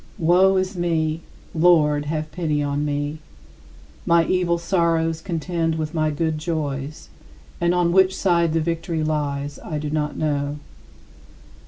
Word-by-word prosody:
Woe 185 +2 +4
is 185 +1 -1
me! 165 -2 0 0.3
Lord, 155 -3 +4
have 155 +1 -3
pity 150 -3 -1
on 145 0 -1
me; 145 +1 -2 0.8
my 170 0 +4
evil 180 -2 +1
sorrows 165 -2 0
contend 165 -1 -2
with 155 0 -3
my 155 -2 +1
good 155 +1 -1
joys, 150 -3 -4 0.5
and 175 +1 +2
on 175 -1 +2
which 190 0 +4
side 170 -4 +2
the 165 - +1
victory 165 0 -2
lies 145 -2 -2
I 155 - -5
do 150 0 -4
not 150 -1 -2
know. 145 -1 -1
160 Hz, 140 wpm, -22 LUFS, 150-170 Hz, 0.8 s, Woe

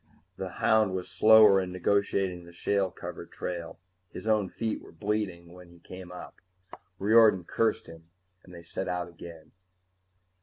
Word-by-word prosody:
_ - - -44 0.3
The - - -5
hound 110 -4 +2
was 90 -1 -5
slower 110 -3 +7
in 90 -1 -5
negotiating 95 -1 0
the 85 - -13
shale 100 +2 0
covered - - -9
trail; 85 -2 -6 0.3
his - - -9
own 105 -4 +1
feet 110 +2 -3
were - - -14
bleeding 100 -5 -3
when 90 -1 -14
he 85 - -17
came 90 +1 -11
up. 90 - -11 0.6
Riordan 105 -2 +5
cursed 115 +5 0
him 80 0 -14 0.3
and 90 - -16
they 85 -1 -11
set 90 +3 -5
out 90 -1 -3
again. 85 -2 -12
95 Hz, 160 wpm, -28 LUFS, 85-105 Hz, 0.6 s, slower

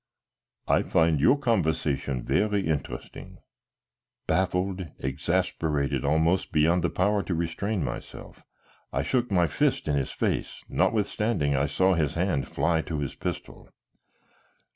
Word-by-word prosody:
"I - - +4
find 80 -2 +2
your 130 - +5
conversation 80 - 0
very 105 -2 +1
interesting." 70 -6 -5 0.9
Baffled, 95 0 0
exasperated 75 0 -1
almost 80 +6 +2
beyond 85 +3 +3
the - - +2
power 100 +2 +1
to 95 - -3
restrain 85 +4 -2
myself, 65 - -7 0.5
I - - -1
shook 125 -2 0
my 90 -4 +3
fist 75 - 0
in 75 - +1
his 70 -2 -1
face, - - -2
notwithstanding 105 -8 +1
I 70 +1 +1
saw 95 +6 +2
his 80 -5 0
hand 85 -5 0
fly 80 +1 +1
to 80 -1 -4
his 70 -2 -3
pistol. - - -6
85 Hz, 125 wpm, -27 LUFS, 75-95 Hz, 0.9 s, your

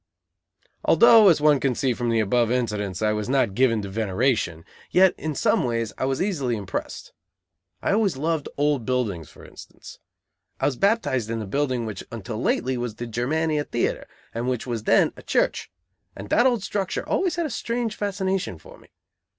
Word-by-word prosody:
Although, 225 -3 +7
as 165 - +4
one 150 -2 +4
can 130 -2 0
see 130 0 +1
from 120 0 -2
the 115 -1 +2
above 115 +2 +2
incidents, 105 -6 -2
I 105 - +3
was 105 +1 -3
not 130 -6 +2
given 115 -2 +2
to - - -5
veneration, 105 -4 -1 0.2
yet 185 0 +5
in 155 -2 -4
some - - +2
ways 115 -3 -2
I - - -2
was 135 +5 0
easily 140 - -1
impressed. 100 -3 -6 0.7
I - - +1
always 200 -7 +1
loved 160 +1 -1
old 145 -3 +1
buildings, 110 - -2
for - - -15
instance. - - -13 0.6
I - - 0
was 145 - +1
baptized 130 - +1
in 115 - -2
the 110 - -4
building 130 +2 -1
which 105 -3 -6
was - - -14
until 110 0 -5
lately 130 0 0
the 120 -1 -4
Germania 150 +7 -1
Theatre, 120 - -2 0.3
and 120 +2 -2
which 125 -3 -2
was 115 -3 -4
then - - +4
a - - -12
church; - - 0 0.5
and 100 +1 -9
that 240 - +5
old 240 -6 0
structure 195 -1 -3
always 370 -3 0
had 340 -1 -1
a 300 - -4
strange 230 -1 -2
fascination 190 - -2
for - - -15
me. - - -20
125 Hz, 185 wpm, -24 LUFS, 110-160 Hz, 0.7 s, Although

